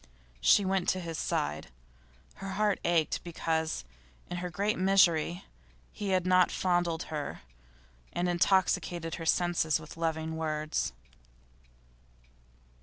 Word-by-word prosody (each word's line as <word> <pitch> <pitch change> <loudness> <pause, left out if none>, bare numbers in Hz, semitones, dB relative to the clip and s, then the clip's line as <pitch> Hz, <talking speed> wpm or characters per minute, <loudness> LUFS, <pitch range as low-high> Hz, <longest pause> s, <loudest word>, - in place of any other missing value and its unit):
She 190 - +5
went 190 -1 +1
to 185 - +1
his 165 -3 -5
side. 75 0 -2 0.7
Her 195 0 -5
heart 210 +1 +1
ached 170 -3 +1
because, 160 - -2 0.5
in 175 - -2
her 180 0 -3
great 200 +5 -1
misery, 180 -2 +3 0.5
he 205 -2 -4
had 185 -2 +2
not 185 0 +5
fondled 175 -2 0
her, 150 -2 -4 0.7
and 175 +1 -1
intoxicated 175 -2 +1
her 165 - -4
senses 170 -3 +2
with 155 +1 -11
loving 160 -1 -2
words. 155 -1 -1
175 Hz, 115 wpm, -30 LUFS, 160-185 Hz, 0.7 s, She